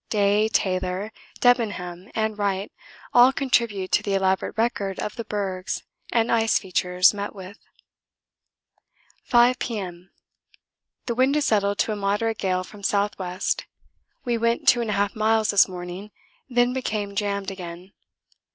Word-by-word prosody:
Day, 205 0 +3
Taylor, 185 +1 -1 0.3
Debenham, 205 -6 +1
and 220 -1 0
Wright 200 -1 -2 0.4
all 245 +2 +7
contribute 235 -8 0
to - - +3
the 200 -1 -1
elaborate 190 +1 0
record 205 -4 -1
of 210 - -4
the 230 - -4
bergs 195 -4 -3 0.3
and 230 0 +2
ice 225 -1 +3
features 180 0 +2
met 205 +1 -5
with. 190 +2 -10 1.7
5 245 0 +4
P.M. 185 -6 -5 1.0
The 240 - -1
wind 260 +4 +2
has 300 -1 +1
settled 200 -2 +1
to - - +1
a - - -1
moderate 205 +2 -1
gale 185 -1 0
from 205 +3 -13
S.W. 200 -2 -1 0.9
We 240 -2 0
went 230 +1 0
2 240 - +6
1/2 205 -3 0
miles 220 0 +2
this 205 - +5
morning, 180 +2 -7 0.4
then 245 0 +2
became 210 -6 -3
jammed 200 -1 -2
again. 180 0 -9
205 Hz, 135 wpm, -24 LUFS, 190-225 Hz, 1.7 s, all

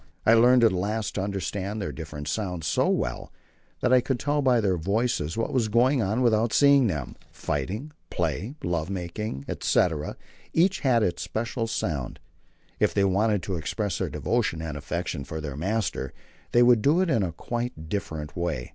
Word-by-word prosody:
I 110 - +6
learned 120 +2 +6
at 115 - +6
last 105 +4 -2
to 95 - -2
understand 100 +1 -3
their 100 - -3
different 75 -3 -7
sounds 90 -3 -2
so 75 - +2
well - - -2 0.5
that 125 - +3
I 130 - +6
could 130 0 -2
tell 145 0 +1
by 130 -3 +4
their 100 -4 +2
voices 95 -2 -1
what 115 - -1
was 120 -4 +2
going 125 +5 +3
on 110 +5 0
without 115 -1 +2
seeing 140 -3 +6
them. 75 -9 -3 0.2
Fighting, 105 - -3 0.2
play, 90 - -2
love 85 -1 -1
making, 90 -4 -4
etc., 80 -4 0 0.4
each 185 +4 +3
had 125 -5 +3
its 90 - -1
special 115 +1 -2
sound. 75 - -3 0.6
If - - +2
they 100 - +3
wanted 100 0 +2
to 95 -1 -2
express 95 +4 -2
their - - -1
devotion 80 - -1
and 80 -2 -4
affection 80 +1 -3
for 80 +3 -6
their 75 -3 -5
master, 95 - -2 0.4
they 120 - +5
would 120 -2 +5
do 150 +9 +4
it 185 -3 +1
in 115 - +3
a 90 -3 -1
quite 120 -1 -4
different 80 -5 -4
way. 85 -8 -2
100 Hz, 180 wpm, -26 LUFS, 80-120 Hz, 0.6 s, I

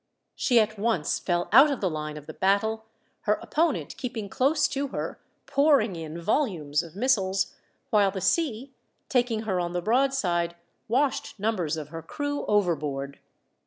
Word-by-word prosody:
She 245 -3 +3
at 215 -1 0
once 205 -9 0
fell 175 -1 -1
out 270 +7 +8
of 280 - -2
the 195 - 0
line 155 -2 -4
of 150 - -10
the 155 - -8
battle, 220 +5 +1 0.4
her 210 - +4
opponent 320 +5 -1
keeping 230 -6 -5
close 285 +7 +2
to 280 0 -2
her, - - -5 0.3
pouring 280 - +3
in 160 0 -6
volumes 170 - 0
of 170 0 -12
missiles, 195 -5 +1 0.4
while 205 -2 +4
the 190 0 -4
sea, 265 - 0 0.4
taking 240 -3 +1
her 190 -4 -1
on 175 0 -2
the 180 - 0
broad 260 +6 +3
side, 175 -9 0 0.3
washed 260 -2 0
numbers 185 -7 -1
of 150 -2 -6
her 165 +1 -7
crew 290 - -4
overboard. 150 -8 0
210 Hz, 165 wpm, -26 LUFS, 170-260 Hz, 0.4 s, out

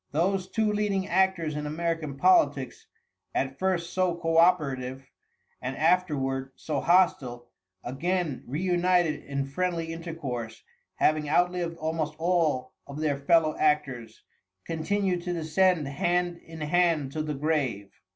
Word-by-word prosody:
Those 185 +4 +1
two 220 -2 +1
leading 200 -2 0
actors 190 -5 +1
in 150 0 -3
American 160 -2 -2
politics, 145 -6 +2 0.5
at 135 0 -1
first 185 -3 -1
so 185 -2 +1
co 165 -1 0
operative 135 -6 +2 0.5
and 130 +1 -4
afterward 140 -6 +1
so 150 -3 -3
hostile, 135 -9 +2 0.3
again 160 +3 -2
reunited 175 +2 +1
in 140 -1 -3
friendly 165 +2 -2
intercourse, 150 -9 -6 0.3
having 150 -1 +1
outlived 175 0 +1
almost 155 -1 -2
all 160 -7 +1
of 140 +1 -7
their 155 -2 +1
fellow 155 +1 +3
actors, 130 -7 0 0.4
continued 180 +3 -1
to 175 0 -3
descend 165 0 +2
hand 175 +5 0
in 160 -1 -12
hand 155 -3 +2
to 155 - -3
the 150 -1 -3
grave. 135 -9 -1
160 Hz, 125 wpm, -27 LUFS, 140-180 Hz, 0.5 s, fellow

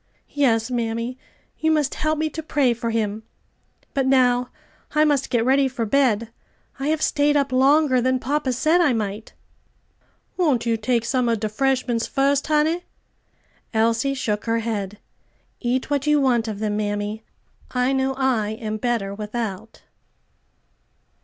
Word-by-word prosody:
"Yes, 245 -5 +1
mammy, 230 +1 -2 0.4
you 315 - +1
must 300 -3 +1
help 310 0 -1
me 315 +1 0
to 320 - -5
pray 285 -5 +1
for 235 0 -4
him. 220 -1 -1 0.7
But 270 -2 0
now 250 -2 +3 0.5
I 305 0 +5
must 290 -3 +1
get 235 -2 +1
ready 270 +1 +3
for 245 -3 -3
bed; 230 -3 +1 0.5
I 275 - -2
have 310 0 0
stayed 290 0 +2
up 280 -1 0
longer 265 0 +4
than 255 +1 +2
papa 275 +2 -1
said 315 +8 +3
I 295 -7 +3
might." 210 -1 -4 1.0
"Won't 290 -10 +1
you 230 -1 +2
take 230 +1 0
some 250 0 +1
of 230 -2 +1
de 215 0 -2
'freshments 250 0 0
fust, 275 +1 +1
honey?" 310 +3 +1 0.9
Elsie 230 +5 +2
shook 210 -5 -2
her 230 0 +1
head. 210 -3 -3 0.6
"Eat 255 +3 -1
what 285 0 0
you 300 0 +4
want 245 -4 +2
of 215 -2 -4
them, 210 0 -2
mammy. 205 +1 -2 0.5
I 250 +1 +1
know 265 0 0
I 245 -6 0
am 215 -2 -3
better 225 -4 -1
without." 215 0 -5
250 Hz, 155 wpm, -22 LUFS, 225-275 Hz, 1.0 s, I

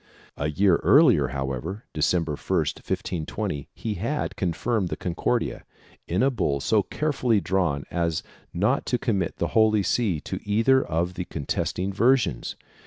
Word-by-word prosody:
A 75 - -2
year 90 +3 +3
earlier, 125 - +5
however, 70 - -4
December 80 +2 +1
1, - - -2 0.2
1520, 80 +1 -3
he 110 - -3
had 115 - -2
confirmed 95 +3 -1
the - - -2
Concordia, 95 +7 -1 0.4
in 90 +7 +1
a 135 - +3
bull 70 - 0
so 105 +9 +2
carefully 125 -3 0
drawn 90 -8 0
as 85 -2 -1 0.3
not - - 0
to 125 - +1
commit 100 -9 -1
the - - -1
Holy 110 -2 +3
See 100 -7 +1
to - - -5
either 115 +6 +3
of 85 +3 -1
the 90 -1 -4
contesting 90 +6 -2
versions. 115 - +2
95 Hz, 145 wpm, -25 LUFS, 80-115 Hz, 0.4 s, earlier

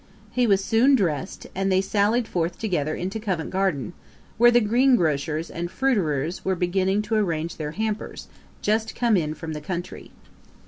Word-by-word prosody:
He 250 -1 +2
was 195 -2 +3
soon 240 +7 +4
drest, 185 - -2
and 195 +1 0
they 185 - +4
sallied 210 +4 +1
forth 175 -2 -2
together 155 -8 -1
into 190 +5 -4
Covent 185 -7 -3
Garden, 185 -5 -1 0.5
where 240 +1 +8
the 240 0 +5
greengrocers 175 - +2
and 175 +1 -4
fruiterers 175 - 0
were 190 - 0
beginning 190 +3 +1
to 215 +2 -4
arrange 170 -6 0
their 150 -1 -4
hampers, 215 +1 -4 0.4
just 220 +1 0
come 235 -3 +2
in 155 -4 0
from 160 +1 -6
the 150 - -6
country. 175 +3 -6
190 Hz, 165 wpm, -24 LUFS, 165-220 Hz, 0.5 s, where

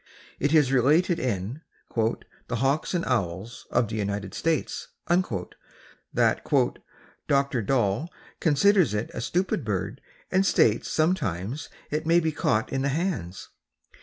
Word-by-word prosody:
It 145 - +1
is 150 -5 +4
related 155 +7 +3
in 115 - -2 0.3
"The 115 +1 -2
Hawks 135 - 0
and 170 - 0
Owls 100 -1 -2
of 120 -1 +2
the 110 +1 -4
United 100 -1 -3
States," 165 -1 -1 0.2
that 170 - -1 0.5
"Dr. 140 -3 +2
Dall 115 - +1 0.3
considers 165 - +4
it 105 +2 -2
a - - -4
stupid 175 +4 0
bird 105 +3 -3 0.3
and 190 +1 +4
states 115 - +3
that - - -5
sometimes 140 - 0 0.2
it 155 +2 -2
may 170 +1 +5
be 160 -2 0
caught 110 -6 0
in 135 - 0
the 140 - +1
hands. 135 - -3
135 Hz, 135 wpm, -26 LUFS, 105-160 Hz, 0.5 s, may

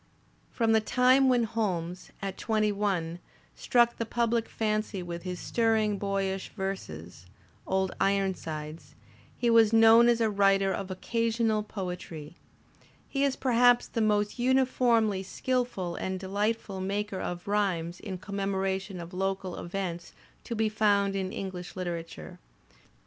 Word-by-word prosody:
From 230 -2 +1
the 220 0 +4
time 255 +4 +4
when 245 -2 +3
Holmes, 185 -6 -3
at 195 -1 -3
twenty 215 -2 0
one, 185 -5 -1 0.3
struck 240 -1 +2
the 230 - -2
public 235 -1 0
fancy 215 -3 -2
with 170 -1 -6
his 180 0 -5
stirring, 220 -3 +1
boyish 195 -1 -2
verses, 90 - -6 0.4
"Old 190 0 0
Iron 195 -1 +2
sides," 155 -2 -8 0.4
he 240 -1 +2
was 225 -2 +6
known 225 +1 +7
as 235 -1 +3
a 225 - +3
writer 195 -2 +3
of 195 -1 -4
occasional 225 +2 0
poetiy; 180 -7 -6 0.7
he 275 0 -1
is 275 -2 +2
perhaps 245 -1 +4
the 230 - -3
most 210 +1 +1
uniformly 245 -5 +2
skilful 195 -2 -2
and 190 0 -3
delightful 200 +1 -2
maker 200 0 -2
of 175 +1 -5
rhymes 185 -4 0
in 195 -4 -6
commemoration 195 0 -2
of 170 +1 -9
local 190 0 -2
events 175 -1 -5 0.3
to 235 - -4
be 220 0 +1
found 205 -2 +2
in 190 -1 -2
English 185 -5 -6
literature. 165 - -6
200 Hz, 135 wpm, -28 LUFS, 185-225 Hz, 0.7 s, known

